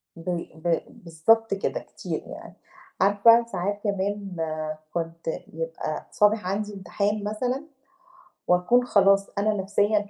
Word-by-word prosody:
ب 170 +1 -3
ب 165 +1 0 0.2
بالضبط 200 +7 +2
كده، 195 - -1
كتير - - -6
يعني. - - -10 0.5
عارفة، 230 +4 +6
ساعات 205 -1 -3
كمان 200 -1 -2 0.6
كنت 165 -1 -4 0.3
يبقى 165 -1 -4
صابح 210 -2 +3
عندي 205 +2 -2
امتحان 200 +2 -2
مثلًا 250 +7 -2 0.8
وأكون 180 +8 +4
خلاص 195 -3 +4
أنا 215 +1 +2
نَفْسيًا 205 +1 +1
200 Hz, 115 wpm, -25 LUFS, 180-210 Hz, 0.8 s, عارفة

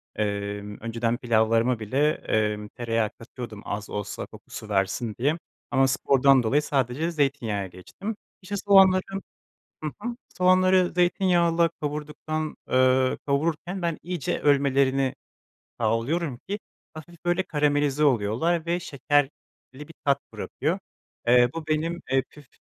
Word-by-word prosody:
Emm, 105 0 -3
önceden 115 +1 -1
pilavlarıma 115 0 +2
bile, 135 +8 +2
emm, 105 -4 -1
tereyağı 115 -1 -1
katıyordum 115 -2 -9
az 105 +1 -4
olsa 105 0 -4
kokusu 110 - -11
versin 100 +3 0
diye 145 +7 +2 0.3
ama 135 0 +4
spordan 135 0 +4
dolayı 135 +7 +2
sadece 140 +3 0
zeytinyağına 130 - 0
geçtim. 190 - -7 0.3
İşte 195 +2 -5
soğanları, 195 -2 +6 0.8
hı 155 - -2
hı, 240 +2 -3 0.2
soğanları 185 0 +4
zeytinyağıyla 175 -2 +3
kavurduktan, 150 +1 -3
ııı, 130 0 +3
kavururken 160 +6 -1
ben 170 -2 -1
iyice 175 -4 -2
ölmelerini 135 -2 +2 0.6
sağlıyorum 120 +6 0
ki 205 +2 -3 0.3
hafif 160 +2 -12
böyle 175 +2 +2
karamelize 145 -2 +1
oluyorlar 140 +7 +2
ve 170 +1 0
şekerli 145 -2 +1 0.4
bir 150 +4 -11
tat 140 -1 +3
bırakıyor. 165 +7 -2 0.5
Eee, 120 0 +6
bu 165 -1 -6
benim, 160 +3 -1
eee, 135 -1 +3
püf 150 -3 -16
140 Hz, 120 wpm, -26 LUFS, 115-165 Hz, 0.8 s, soğanları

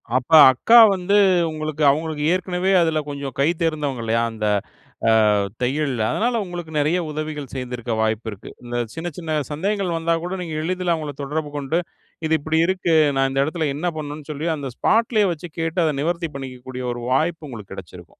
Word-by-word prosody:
அப்ப 130 +4 -1 0.2
அக்கா 225 - +4 0.2
வந்து, 190 +2 0 0.4
உங்களுக்கு 155 -1 -3
அவங்களுக்கு 155 0 -3
ஏற்கனவே 185 +1 -1
அதில 160 -2 +1
கொஞ்சம் 140 -2 -6
கை 140 - +4
தேர்ந்தவங்கல்லையா? 135 -8 0
அந்த 110 -1 -4 0.6
அ - - +5 0.5
தையல். 135 +2 0
அதனால 235 +1 0
உங்களுக்கு 175 -3 -7
நெறைய 155 +5 +2
உதவிகள் 150 -3 -5
செய்திருக்க 125 -3 -4
வாய்ப்பு 110 +1 -1
இருக்கு. 100 - -10
இந்த 120 0 -6 0.2
சின்ன 165 +1 -5
சின்ன 165 -3 -5 0.2
சந்தேகங்கள் 190 +3 -1
வந்தா 165 +1 0
கூட, 180 +2 -4
நீங்க 165 -3 -5
எளிதில 180 0 0
அவங்கள 150 -3 -5
தொடர்பு 150 +2 -3
கொண்டு, 145 +4 -1 0.5
இது 160 - 0
இப்டி 155 +2 0
இருக்கு? 185 -3 0 0.2
நான் 135 0 +2
இந்த 135 0 +1
இடத்தில 160 0 -2
என்ன 175 +5 -1
பண்ணனும்னு 150 0 -7
சொல்லி 150 +3 -4
அந்த 140 -3 -5
ஸ்பாட்லயே 220 -2 +2
வச்சு 170 +2 -9
கேட்டு, 165 +2 -1
அதை 155 - +1
நிவர்த்தி 170 +1 -1
பண்ணிக்ககூடிய 130 -1 -7
ஒரு 120 - -7
வாய்ப்பு 160 +2 0
உங்களுக்கு 105 -6 -9
கெடைச்சிருக்கும். 90 -5 -11
155 Hz, 170 wpm, -22 LUFS, 135-170 Hz, 0.6 s, அ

